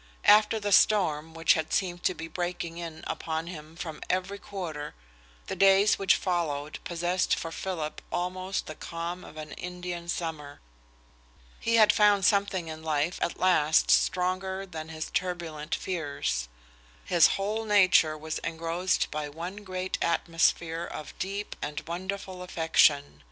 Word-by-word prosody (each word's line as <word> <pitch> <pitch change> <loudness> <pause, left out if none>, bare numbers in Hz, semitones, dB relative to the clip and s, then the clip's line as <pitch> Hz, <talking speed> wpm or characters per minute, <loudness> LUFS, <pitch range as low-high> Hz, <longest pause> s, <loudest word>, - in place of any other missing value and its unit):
After 215 +1 +6
the 205 -1 -2
storm 165 -7 +3
which 165 -1 +4
had 160 -1 -2
seemed 175 -2 0
to 185 - +2
be 165 - -6
breaking 175 -1 -4
in 165 -2 -7
upon 160 0 -3
him 160 -2 -9
from 165 -3 -6
every 185 +2 -1
quarter, 165 -8 -6 0.5
the - - -4
days 195 +1 +5
which 195 -1 +4
followed 155 -5 -2
possessed 175 +1 0
for 165 - -5
Philip 165 -3 -4
almost 185 +2 -2
the 155 - -6
calm 170 +3 -5
of - - -12
an 155 -1 -7
Indian 180 -1 -6
summer. 155 -4 -4 1.0
He 230 - +1
had 215 -2 +6
found 205 -3 +4
something 200 -4 +2
in 160 0 -7
life 155 +2 -1
at - - -1
last 160 -4 +4
stronger 185 +2 +1
than 160 -4 -7
his 155 -1 -5
turbulent 170 -4 -2
fears. 140 - -2 0.6
His 170 -3 +6
whole 210 +3 -1
nature 185 -7 +4
was 155 +1 -4
engrossed 165 +3 -1
by 150 -1 -3
one 170 +6 -6
great 185 -2 -4
atmosphere 165 0 +1
of 155 -3 -7
deep 200 +2 -4
and 150 0 -3
wonderful 185 +2 -5
affection. 160 - +2
175 Hz, 145 wpm, -28 LUFS, 160-190 Hz, 1.0 s, After